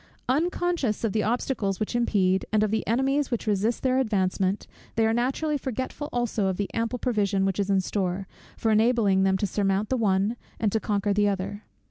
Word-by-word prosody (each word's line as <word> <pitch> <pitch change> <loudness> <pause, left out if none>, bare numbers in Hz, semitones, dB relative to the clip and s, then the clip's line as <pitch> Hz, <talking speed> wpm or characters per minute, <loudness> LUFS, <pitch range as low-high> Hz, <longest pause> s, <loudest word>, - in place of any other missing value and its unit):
Unconscious 330 - 0
of 225 - 0
the 220 - +1
obstacles 215 -4 -1
which 215 +3 -2
impede, 190 -6 +2
and 215 0 +3
of 215 - 0
the 220 - 0
enemies 270 +4 +1
which 235 -4 -2
resist 215 +2 0
their 260 0 +2
advancement; 195 -4 0 0.3
they 225 0 +3
are 220 - +2
naturally 270 +5 0
forgetful 260 +3 -4
also 235 -4 0
of 190 -1 -1
the 205 - -2
ample 230 +2 -1
provision 205 -6 +1
which 195 0 -1
is 200 0 0
in 195 -1 +3
store, 185 0 -2 0.3
for 225 - +1
enabling 215 -3 +3
them 190 0 +3
to 205 - 0
surmount 195 +1 0
the 260 - +1
one, 205 +1 +1 0.2
and 215 -2 +1
to 220 - +1
conquer 205 -1 0
the 205 0 +3
other. 200 +2 -4
215 Hz, 195 wpm, -26 LUFS, 195-240 Hz, 0.3 s, and